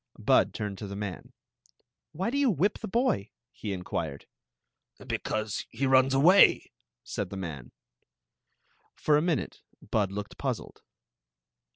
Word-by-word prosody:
Bud - - +3
turned 100 -2 -4
to 105 - -5
the 100 - -6
man. 100 -3 -6 0.4
" - - -49
Why 185 +8 -2
do 280 - -1
you 280 -3 +4
whip 200 +1 +1
the - - -5
boy? 190 - 0
" 115 - -62
he 105 - -3
inquired. 85 -6 -4 0.4
" - - -59 0.3
Because 110 -2 -2
he 130 +4 -2
runs 130 0 +4
away, 180 +8 +6 0.3
said 100 -3 -4
the 100 - -6
man. 80 -9 -6 1.2
For 150 - +2
a 150 - +4
minute 165 -4 -1 0.3
Bud 100 -3 +1
looked 105 +1 -6
puzzled. - - -4
110 Hz, 150 wpm, -28 LUFS, 100-155 Hz, 1.2 s, away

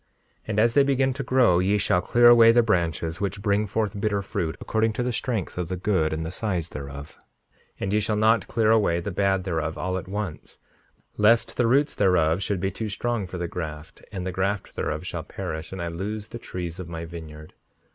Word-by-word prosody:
5:65 - - -44 0.4
And 105 -1 0
as 115 +1 +4
they 140 - +6
begin 135 -1 +2
to 135 - -4
grow 120 -11 +4
ye 100 +3 +2
shall 90 -3 +2
clear 120 +6 +4
away 115 -1 +8
the 120 +1 +4
branches 85 -4 -1
which 100 0 -3
bring 105 0 +1
forth 105 0 -2
bitter 100 -2 0
fruit, 80 -4 -3
according 110 0 0
to 125 - -2
the 125 0 -1
strength 110 -7 -3
of 90 - -2
the 95 - -3
good 90 -4 +1
and 80 +1 -3
the 80 - -4
size 90 -5 -2
thereof; 70 +1 -8 0.6
and 95 - -2
ye 105 - +3
shall 105 +1 0
not 110 +2 +3
clear 110 -1 +2
away 100 -6 +3
the 100 +4 -4
bad 95 0 +1
thereof 80 -3 -2
all 95 0 -2
at 95 - -11
once, 100 -4 -5 0.6
lest 115 +2 +3
the 120 - +2
roots 140 +5 +3
thereof 90 -3 +2
should 100 -1 -1
be 95 +1 -1
too 110 -1 -4
strong 115 0 -2
for 90 - -6
the 85 0 -2
graft, 80 -3 -7
and 90 -2 -5
the 95 - -2
graft 95 +2 -2
thereof 75 +3 -3
shall 90 -2 -4
perish, 80 -2 -6
and 95 -2 -5
I - - -2
lose 105 +5 -5
the 120 - -7
trees 90 -4 -6
of 90 -2 -7
my 85 0 -5
vineyard. 80 -2 -10
95 Hz, 220 wpm, -25 LUFS, 85-110 Hz, 0.6 s, away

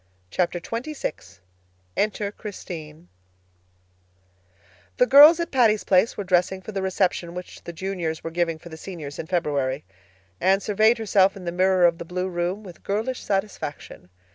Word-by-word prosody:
Chapter 175 -1 0
XXVI 230 - -5 0.6
Enter 205 -1 -1
Christine 170 -6 -9 1.9
The - - +5
girls 295 +6 +9
at 340 - -3
Patty's 225 -5 +3
Place 190 +4 +3
were 205 - -2
dressing 185 0 +1
for 215 - -7
the 195 -2 -3
reception 185 -2 -1
which 180 0 -9
the - - -5
Juniors 170 -2 -4
were 165 - -5
giving 165 -1 0
for 170 +2 -13
the 160 - -9
Seniors 160 -5 -8
in 160 - -5
February. 145 -6 -1 0.6
Anne 190 +1 +3
surveyed 215 +3 +3
herself 195 -3 +3
in 185 - -10
the 170 - -2
mirror 185 0 +3
of 170 -1 +2
the 170 - -6
blue 180 +2 -3
room 180 +4 -2
with 180 -4 -12
girlish 220 +6 -2
satisfaction. 195 - -4
185 Hz, 155 wpm, -24 LUFS, 170-210 Hz, 1.9 s, girls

